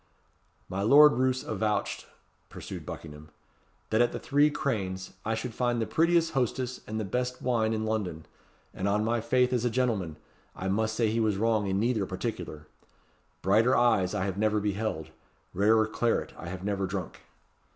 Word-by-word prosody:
"My 95 +1 -3
Lord 145 +8 +7
Roos 130 0 +1
avouched," 105 0 -2 0.4
pursued - - -8
Buckingham, 75 +1 -9 0.6
"that 110 +2 +3
at 120 - +3
the - - -4
Three 145 +1 +3
Cranes 95 -11 -3
I 110 +1 -1
should 115 +1 -4
find 120 0 0
the 110 - 0
prettiest 165 +4 +2
hostess 130 -1 -1
and 110 +1 -3
the 110 - -2
best 125 +5 -2
wine 115 -3 +1
in 110 -1 -1
London; 95 -8 -2 0.5
and 95 - -2
on 105 +2 +1
my 115 0 0
faith 125 +2 +2
as 120 -2 +1
a 120 - +2
gentleman! 110 -10 -1 0.4
I 95 - -3
must 110 +3 0
say 110 -2 +1
he 115 - 0
was 110 -3 +1
wrong 110 -1 +1
in 95 0 0
neither 110 -3 +1
particular. 90 -6 -5 0.8
Brighter 110 +7 +4
eyes 110 -6 +3
I 100 -2 0
have 95 0 -3
never 110 0 +2
beheld 105 -5 -2 0.4
rarer 110 +3 +4
claret 115 +1 -1
I - - -9
have 95 0 -6
never 100 -1 -1
drunk." 95 -2 -5
110 Hz, 170 wpm, -28 LUFS, 100-120 Hz, 0.8 s, Lord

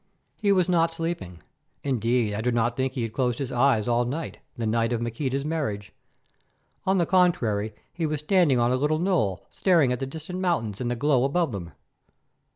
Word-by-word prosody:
He 205 -2 +2
was 185 -3 +3
not 165 -2 +3
sleeping; 165 - -4 0.4
indeed, 120 -4 +1
I 105 - -2
do 125 +2 +1
not 120 0 +1
think 130 0 -1
he 125 - -2
had 115 -1 -4
closed 125 -3 0
his 135 -3 -4
eyes 125 -3 +2
all 120 0 +2
night, 145 +7 -4 0.2
the 115 - -2
night 115 +2 +1
of 115 - 0
Maqueda's 130 +4 -2
marriage. 140 -11 -3 0.9
On 190 0 +3
the 175 - +3
contrary, 115 - +2 0.2
he 165 -2 -1
was 155 -1 -2
standing 150 -6 +3
on 120 +1 +2
a - - +3
little 150 +3 +1
knoll 155 - 0
staring 165 -9 +3
at 125 - -3
the 135 - -3
distant 160 +6 -6
mountains 130 - -1
and 120 - -1
the 120 - -1
glow 135 0 +2
above 155 +2 +1
them. 85 -6 -6
130 Hz, 195 wpm, -26 LUFS, 115-165 Hz, 0.9 s, was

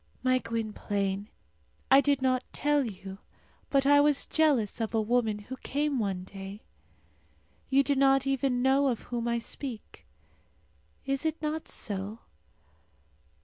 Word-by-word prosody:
My 255 0 +3
Gwynplaine, 205 -3 -3 0.6
I 270 +1 +8
did 280 -2 +1
not 255 -1 +2
tell 295 -1 +2
you, 195 -4 -7 0.5
but 275 -1 +2
I 285 +1 +6
was 290 -1 +3
jealous 270 -9 +1
of 225 0 -2
a - - +3
woman 220 -1 +1
who 230 +6 -8
came 285 0 -1
one 195 -4 -2
day. 195 +2 -9 1.1
You 275 +1 +4
do 285 - +1
not 270 0 +4
even 270 -2 0
know 270 +1 +4
of 240 -4 -1
whom 235 -1 -4
I 235 0 +1
speak. 235 0 -7 1.0
Is 275 +1 -1
it 320 0 -1
not 310 +1 -3
so? 205 -1 -3
255 Hz, 140 wpm, -29 LUFS, 215-275 Hz, 1.1 s, I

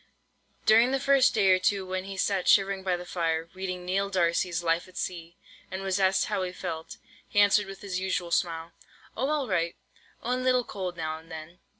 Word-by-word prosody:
During 225 +3 +6
the 270 +1 +1
first 275 -2 +4
day 195 -3 +4
or 185 - +5
two, 195 +1 +1
when 185 0 -3
he 195 0 -7
sat 190 -1 0
shivering 195 -1 +4
by 185 -2 0
the 175 - -8
fire, 165 -2 -1
reading 185 -1 -5
"Neill 195 +2 0
D'Arcy's 175 -2 +1
Life 165 +1 +1
at 185 - -14
Sea," 170 -2 -5 0.3
and 190 +1 -5
was 190 0 0
asked 190 0 +3
how - - -1
he 180 -1 -2
felt, 160 -3 -6 0.3
he 205 - +1
answered 205 0 +5
with 195 0 -9
his 190 -3 -3
usual 185 -2 -2
smile; 165 -1 0 0.4
"Oh, 265 +5 -1
all 300 -3 0
right; 170 -4 0 0.5
only 250 +2 -1
a - - -4
little 255 -1 +3
cold 185 -5 -5
now 160 -1 -3
and 165 +1 -19
then." 160 +3 -9
185 Hz, 210 wpm, -28 LUFS, 170-200 Hz, 0.5 s, During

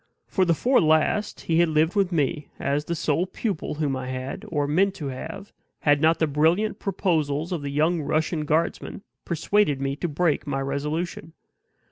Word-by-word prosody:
For 190 - +1
the 170 -2 +3
four 255 - +3
last 160 +6 +2
he 165 0 +1
had 170 -1 +4
lived 155 +2 +2
with 195 -3 +1
me 150 -2 0
as 145 +2 -1
the 170 - -2
sole 160 +3 0
pupil 195 -7 -3
whom 145 -3 -1
I 130 -1 -5
had, 130 +1 -5
or 145 -3 0
meant 190 +6 +2
to 145 -6 -5
have, 160 +9 -7 0.3
had 145 -1 +3
not 160 +1 +4
the 160 - +2
brilliant 160 +9 +1
proposals 160 -5 -1
of 175 -4 -2
the 140 - -4
young 155 +4 +1
Russian 155 +1 -1
guardsman 165 +5 -1 0.2
persuaded 170 -2 +1
me 135 0 -1
to 175 - -2
break 155 -1 0
my 135 -1 -1
resolution. 150 +4 -3
160 Hz, 180 wpm, -25 LUFS, 145-175 Hz, 0.3 s, had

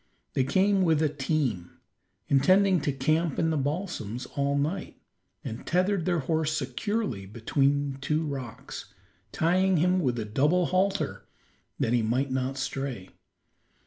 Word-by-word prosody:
They 135 - +2
came 190 +8 +3
with 165 -4 +3
a 155 - +3
team, 130 - -2 0.5
intending 185 +6 +4
to 145 - 0
camp 155 +3 0
in 165 -1 +2
the - - 0
balsams 140 - -3
all 140 0 +1
night, 160 +7 -2 0.4
and 115 - -6
tethered 185 0 +1
their 175 -3 +1
horse 155 +2 0
securely 135 - -2
between 135 +5 0
two 155 +3 0
rocks, 135 -6 -7 0.4
tying 185 +3 +2
him 180 +3 +3
with 125 -8 0
a 110 - -2
double 150 +12 +2
halter 190 +2 0 0.5
that 115 - +1
he 120 - +3
might 125 +5 0
not 130 +1 -1
stray. 135 -7 -4
145 Hz, 140 wpm, -27 LUFS, 130-180 Hz, 0.5 s, intending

